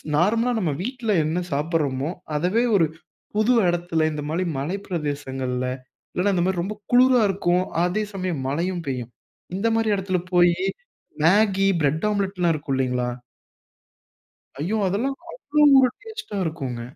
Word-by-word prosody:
நார்மலா 225 +9 +2
நம்ம 165 -7 0
வீட்டில 245 -2 -2
என்ன 160 +3 0
சாப்பிடுறோமோ! 145 -1 0 0.3
அதவே 185 +10 +1
ஒரு 165 -5 +4 0.5
புது 220 +4 +3
இடத்துல, 170 -2 +1
இந்தமாரி 150 +4 -2 0.2
மலை 170 +8 -2
பிரதேசங்கள்ல 135 -6 -3 0.5
இல்லன்னா, 195 +2 +1
இந்த 175 - +2
மாரி 185 -2 0
ரொம்ப 210 +4 -4 0.2
குளிரா 250 0 +6
இருக்கும். 180 -2 +1 0.2
அதே 185 +5 0
சமயம், 185 -6 -3
மழையும் 170 +4 -2
பெய்யும். 125 -3 -4 0.5
இந்த 220 - 0
மாரி 225 -1 +1
இடத்துல 185 -1 -1
போயி 175 -1 +5 0.7
மேகி, 195 +2 +4
பிரெட் 150 +5 +1
ஆம்லெட்லாம் 190 -4 0
இருக்கும் 145 -2 -3
இல்லேங்களா! 125 -1 0 1.5
ஐயோ! 190 +8 -1
அதெல்லாம் 245 +9 -1 0.2
அவ்வளவு 295 - +4
ஒரு 255 - +4
டேஸ்ட்டா 440 - -7
இருக்கும்ங்க. 135 -8 -4
180 Hz, 130 wpm, -23 LUFS, 150-210 Hz, 1.5 s, குளிரா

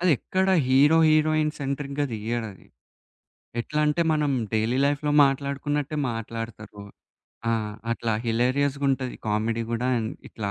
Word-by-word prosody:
అది 180 -1 +3
ఎక్కడ 190 0 -1 0.2
hero, 145 +5 +5
heroine 155 0 +3
సెంట్రిక్‌గా 140 +1 -2
తీయడది. 110 -2 -4 0.9
ఎట్లా 150 +5 -2
అంటే 150 +3 +1
మనం 150 -2 +1 0.2
డైలీ 110 +3 +1
లైఫ్‌లో 145 +1 0
మాట్లాడుకున్నట్టే 140 +2 -1
మాట్లాడతారు. 115 -2 -7 0.7
ఆ! - - +2 0.4
అట్లా 115 -1 -2
హిలేరియస్‌గుంటది 135 +2 0
కామెడీ 110 +2 0
గూడా 120 +2 -1
ఎంత్ 110 0 -4
ఇట్లా 105 -3 -4
135 Hz, 115 wpm, -25 LUFS, 115-145 Hz, 0.9 s, hero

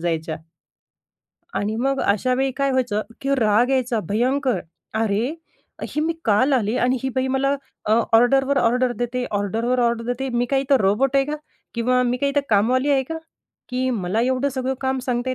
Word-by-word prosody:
जायच्या 165 -1 -2 1.2
आणि 210 +2 -1
मग 270 +3 0
अशा 215 +5 +1
वेळी 265 +1 +1
काय 275 -1 +1
व्हायचं, 245 -5 0 0.2
की 275 0 +1
राग 225 +2 +3
यायचा 250 -4 +1
भयंकर, 255 +4 +1 0.3
"अरे, 220 +5 0 0.5
ही 300 - -3
मी 320 +2 +1
काल 230 +6 +3
आली 230 -3 +1
आणि 250 +1 +2
ही 265 - -1
बाई 260 0 +1
मला 270 +1 +1 0.3
अ, - - +4 0.2
ऑर्डरवर 270 +4 +3
ऑर्डर 250 +1 +2
देते, 245 +1 -2
ऑर्डरवर 225 +5 0
ऑर्डर 235 -1 +1
देते. 245 +3 -2
मी 240 0 0
काय 270 -1 +3
इथं 275 0 +3
रोबोट 230 +8 +2
आहे 275 - +4
का? 295 +2 -3 0.4
किंवा 250 +2 +2
मी 245 0 0
काय 280 +2 0
इथं 285 +1 +2
कामवाली 250 +7 +3
आहे 275 -2 +3
का? 325 - -4 0.5
की 255 0 -1
मला 210 -2 -1
एवढं 260 +3 +1
सगळं 260 -1 -2
काम 265 0 0
सांगते." 250 +1 -1
250 Hz, 180 wpm, -22 LUFS, 230-270 Hz, 1.2 s, अ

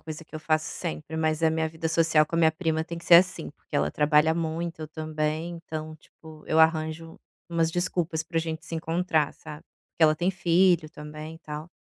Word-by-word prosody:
coisa 155 +1 -8
que 155 - -18
eu 155 - -5
faço 155 0 +1
sempre, 160 -2 -5
mas, 155 0 0
eh, 160 - +4
minha 160 0 0
vida 160 0 -4
social 160 -1 +4
com 165 - -7
a - - +2
minha 160 -1 +4
prima 160 -2 -1
tem 170 +1 -7
que 170 - -12
ser 175 - +7
assim, 175 - +4
porque - - -7
ela 75 +1 +1
trabalha 150 +2 +3
muito, 165 0 -3
eu 155 - -6
também. 155 +1 -3
Então, 155 -1 -7
tipo, 155 0 -16
eu 160 - +1
arranjo 160 0 +1 0.3
umas 165 -1 +1
desculpas 175 -2 -1
pra 165 +1 -2
gente 160 0 -4
se 165 - -5
encontrar, 165 -1 0
sabe, 150 +1 -10 0.3
porque 165 - -3
ela 155 0 +5
tem 175 +4 +1
filho 175 -2 +3
também 155 +1 -9
e - - -18
tal. 155 0 -7
160 Hz, 215 wpm, -26 LUFS, 155-165 Hz, 0.3 s, ser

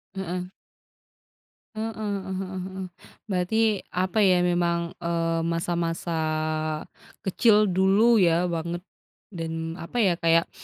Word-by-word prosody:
Heeh. 180 -1 -4 1.3
Heeh 220 +1 -3
heeh 200 -3 -3
heeh 190 -1 -5
heeh, 190 0 -6 0.4
berarti 180 +3 0 0.4
apa 185 +3 -1
ya, 180 -2 +4
memang, 175 -1 +2 0.2
eee, 165 -1 0
masa-masa 170 0 -1 1.0
kecil 210 +2 +4
dulu 195 +6 +4
ya, 175 -1 +3
banget. 170 +1 -3 0.5
Dan 165 -2 -4
apa 230 +7 -2
ya 180 -5 +3
kayak 165 0 +3
180 Hz, 105 wpm, -26 LUFS, 170-190 Hz, 1.3 s, ya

